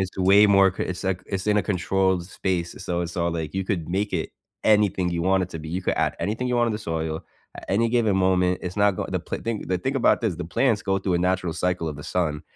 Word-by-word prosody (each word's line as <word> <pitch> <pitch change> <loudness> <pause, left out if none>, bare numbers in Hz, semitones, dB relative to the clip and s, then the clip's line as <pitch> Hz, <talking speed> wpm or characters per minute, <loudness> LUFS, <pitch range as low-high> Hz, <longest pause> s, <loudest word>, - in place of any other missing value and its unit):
It's 95 0 -3
way 100 +3 +6
more 100 -2 +5
c - - -1
it's 90 0 -4
like 95 -1 -1
it's 95 0 -3
in 105 0 +3
a 105 - +3
controlled 95 -2 0
space, 90 -3 -2
so 85 -1 -1
it's 85 0 -5
all 85 -1 +1
like 80 -1 -4
you 95 -1 -1
could 85 -5 -2
make 100 +3 -1
it 85 -4 -2 0.3
anything 105 -4 +3
you 85 -1 -2
want 95 +1 +2
it - - -11
to 80 - -6
be, 80 0 -8
you 90 +4 -2
could - - 0
add - - +1
anything 110 +5 -2
you 125 - +1
want 120 0 +3
in 115 - 0
the 105 - -3
soil 80 -5 -3 0.3
at - - -9
any 115 +4 +2
given 110 -4 +2
moment, 90 -1 +2
it's 90 +1 -6
not 105 0 +4
going - - -4
the - - -1
pl - - -5
thing 115 -2 -3
the 90 0 0
thing 135 +8 -2
about 130 - +3
this, 110 -7 0
the 90 - -5
plants 105 +6 +1
go 95 -1 0
through 95 -1 -1
a 85 - +2
natural 90 -1 0
cycle 90 -2 -1
of 75 - -5
the 75 - -9
sun. 80 -5 -1
95 Hz, 275 wpm, -24 LUFS, 85-100 Hz, 0.3 s, way